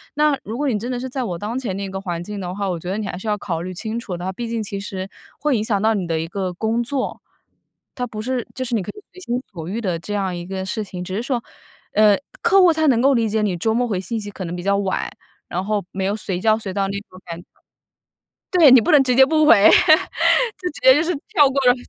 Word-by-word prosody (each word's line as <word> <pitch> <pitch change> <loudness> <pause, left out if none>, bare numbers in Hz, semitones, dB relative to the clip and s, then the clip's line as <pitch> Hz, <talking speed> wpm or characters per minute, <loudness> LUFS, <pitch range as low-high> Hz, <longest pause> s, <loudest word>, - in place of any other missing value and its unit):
那 300 -2 +3
如 225 +3 -5
果 290 0 -1
你 225 - 0
真 240 +4 -4
的 245 - -2
是 260 - -4
在 260 0 -3
我 180 -6 -3
当 225 +4 -3
前 210 -8 -4
那 195 -1 -4
个 190 0 -5
环 175 -3 -4
境 205 +1 -6
的 180 0 -4
话， 200 -1 -2
我 175 -2 -2
觉 175 - -7
得 195 - -2
你 215 - -3
还 - - -5
是 205 - -8
要 210 - +1
考 165 -5 -4
虑 185 +1 -5
清 220 +5 -4
楚 185 -6 -5
的， 185 +2 -4
毕 235 +4 -5
竟 230 -2 -2
其 200 0 -5
实 190 -1 -5 0.3
会 295 -3 +1
影 210 - -1
响 210 -3 0
到 220 +1 +3
你 185 -5 -2
的 165 -1 -1
一 165 - -3
个 185 +1 -3
工 225 +5 -1
作。 260 +2 -3 0.7
它 250 - -2
不 215 -2 -6
是 250 0 -3
就 260 - -3
是 240 - -1
你 210 - 0
可 - - -6
以 415 - -13
随 370 - -13
心 245 -4 -2
所 165 -2 -7
欲 225 +5 -3
的 180 -5 -1
这 205 +5 -6
样 190 -3 -1
一 175 0 -6
个 190 0 -4
事 215 +3 -3
情， 180 -3 -7
只 185 +1 -5
是 220 - -1
说， 245 -3 -2 0.5
呃， 210 -1 +5 0.3
客 390 +2 +5
户 360 -2 +6
他 315 0 0
能 240 -3 +4
够 275 +1 +4
理 230 -1 +2
解 220 +1 0
你 195 -4 0
周 220 +5 0
末 245 +1 +1
回 195 -5 -1
信 220 +5 -4
息 205 - -7
可 190 -2 -6
能 170 - -5
比 175 - -5
较 200 0 +2
晚， 195 -1 -1 0.4
然 180 +2 -3
后 210 -1 -1
没 190 0 -3
有 200 +2 0
随 190 -4 -4
叫 215 +2 +3
随 195 -3 -5
到 200 - 0
的 195 - -1
那 200 0 -3
种 185 - -14
感 170 0 -7
觉。 - - -22 1.1
对， 335 -7 +7
你 255 - +8
不 - - -1
能 290 -2 +7
直 250 - +2
接 265 0 +8
不 310 +1 +3
回， 205 -8 +7
就 310 0 +4 0.5
直 - - -12
接 260 0 +8
就 295 - +3
是 345 +2 0 0.2
跳 300 -10 +5
过 275 - -2
了 245 - +7
210 Hz, 310 characters per minute, -21 LUFS, 190-245 Hz, 1.1 s, 你